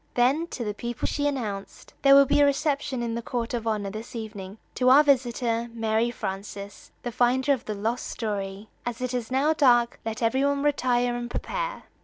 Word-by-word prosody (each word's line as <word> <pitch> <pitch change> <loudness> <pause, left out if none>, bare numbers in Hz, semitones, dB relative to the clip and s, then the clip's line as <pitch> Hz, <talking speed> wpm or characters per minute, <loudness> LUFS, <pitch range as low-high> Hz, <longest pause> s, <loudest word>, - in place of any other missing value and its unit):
Then 270 +7 +2
to 250 - -5
the 210 -2 -2
people 235 +2 -4
she 290 -1 0
announced: 215 -8 -5
"There 275 0 +7
will 280 0 +8
be 280 - +2
a 290 - +7
reception 280 -3 0
in 230 -1 -2
the 235 - -3
court 235 +1 -3
of 230 -2 -3
honor 210 -3 -1
this 220 +4 -8
evening 210 -3 -7 0.2
to 255 0 +2
our 280 +4 +8
visitor, 240 -4 +1
Mary 225 +1 +1
Frances, 200 -2 -6
the 240 - -3
finder 255 +3 +2
of 255 -3 -4
the 215 - -3
lost 225 +5 -2
story. 200 -2 -4 0.2
As 240 -1 -4
it 255 0 -3
is 245 -3 -2
now 275 +4 +2
dark, 240 -6 +3
let 225 +1 -4
every 260 +4 +2
one 280 0 +1
retire 245 -4 +1
and 240 0 -4
prepare." - - -4
240 Hz, 200 wpm, -26 LUFS, 220-270 Hz, 0.2 s, will